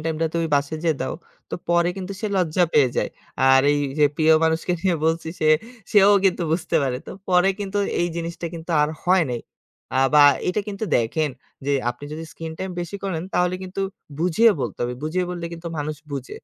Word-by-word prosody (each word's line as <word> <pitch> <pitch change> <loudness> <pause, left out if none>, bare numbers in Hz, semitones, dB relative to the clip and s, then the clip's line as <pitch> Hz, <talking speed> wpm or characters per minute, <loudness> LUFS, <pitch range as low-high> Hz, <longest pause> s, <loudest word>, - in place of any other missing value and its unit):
time 160 -1 -2
টা 165 - +3
তুমি 165 -1 +1
বাসায় 145 +2 0
যেয়ে 160 -3 +2
দাও। - - -2 0.4
তো - - -2
পরে 170 0 +3
কিন্তু 190 +1 -5
সে 215 - -1
লজ্জা 180 -1 +2
পেয়ে 140 -4 +5
যায়। - - +1 0.4
আর 135 0 +7
এই 145 - +1 0.2
যে 150 - +6
প্রিয় 160 0 +5
মানুষকে 160 +2 +1
নিয়ে 180 -2 +1
বলছি। 160 0 0
সে 155 - +3 0.4
সেও 205 -1 +7
কিন্তু 185 -2 +2
বুঝতে 170 +1 0
পারে। 130 -2 0
তো - - -7 0.2
পরে 180 +1 +4
কিন্তু 200 0 -2 0.2
এই 175 - +2
জিনিসটা 170 0 -4
কিন্তু 165 +1 -8
আর 150 - +2 0.2
হয় 185 0 +4
নাই 120 -1 -3 0.6
আ - - +3 0.2
বা 150 - +8 0.3
এটা 195 +3 +1
কিন্তু 205 +2 -4
দেখেন। 145 +7 0 0.4
যে 145 - +1 0.2
আপনি 120 +4 -9
যদি 160 +1 -6
screen 165 -1 -7
time 190 0 -4
বেশি 175 +3 -5
করেন 170 -5 -2
তাহলে 180 0 +2
কিন্তু 185 +1 -5 0.4
বুঝিয়ে 180 +7 +4
বলতে - - -4
হবে। 125 +1 -2
বুঝিয়ে 170 +4 -1
বললে 175 -1 -5
কিন্তু 170 0 -6
মানুষ 150 +1 -3 0.2
বুঝে। 135 -2 -5
165 Hz, 205 wpm, -23 LUFS, 155-180 Hz, 0.6 s, বা